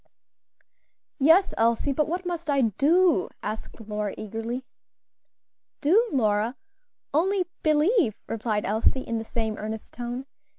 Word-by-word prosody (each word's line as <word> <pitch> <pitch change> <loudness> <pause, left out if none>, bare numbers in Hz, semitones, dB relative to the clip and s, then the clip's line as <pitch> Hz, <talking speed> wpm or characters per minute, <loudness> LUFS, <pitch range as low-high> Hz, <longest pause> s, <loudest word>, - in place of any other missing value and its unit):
'" - - -50 0.3
"Yes, 325 +8 +5
Elsie, 230 +5 +2
but 300 +2 +1
what 355 +3 -3
must 340 -3 -4
I 280 -1 +3
do?" 290 - +3
asked 215 +3 -6
Lora, 210 -1 -3
eagerly. 225 +4 -4 1.1
"Do, 415 +11 +3
Lora? 220 -2 +1 0.6
only 370 +5 +2 0.2
believe" 310 - +3
replied 220 -2 -1
Elsie, 220 +6 +1
in 230 -3 -3
the - - -4
same 220 -1 -3
earnest 215 +1 -6
tone. 245 +2 -5
245 Hz, 125 wpm, -26 LUFS, 220-320 Hz, 1.1 s, Yes